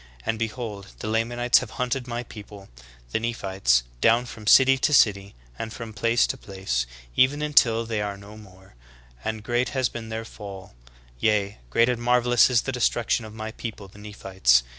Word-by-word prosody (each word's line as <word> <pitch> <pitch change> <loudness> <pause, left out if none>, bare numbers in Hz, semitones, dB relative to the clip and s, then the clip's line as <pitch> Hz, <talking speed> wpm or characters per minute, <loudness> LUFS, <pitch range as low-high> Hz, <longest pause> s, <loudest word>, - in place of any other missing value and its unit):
And 110 - -1
behold, 110 -3 -5
the - - -6
La 110 +1 +2
manites 120 +2 +2
have - - -7
liunted 125 0 -2
my 120 0 -4
people, 100 -3 -12 0.4
the - - 0
Nephites, 95 - +1 0.2
down 115 +2 +4
from 110 -2 -10
city 135 +3 +6
to 150 - +1
city, 100 - +3 0.2
and 110 - -4
from 115 -1 -8
place 115 +2 +2
to 135 - -4
place, 95 - -3 0.3
even 145 +4 +3
until 115 -6 +3
they 110 -2 -2
are 100 -1 -3
no 100 +2 -12
more, 95 -3 -16 0.5
and 110 -1 -4
great 120 +2 0
has 130 -2 +2
been 115 -1 -7
their 110 0 -4
fall: 100 -3 -10 0.5
yea, 105 - +1
great 115 - +3
and 125 -2 -1
mar 125 +1 +3
velous 120 0 +4
is 120 -2 +2
the 135 - -2
destruction 120 -2 0
of 110 0 -11
my 110 0 -5
people, 110 -3 -7
the 100 +2 -16
Nephites. 95 -12 +2
110 Hz, 185 wpm, -25 LUFS, 100-120 Hz, 0.5 s, city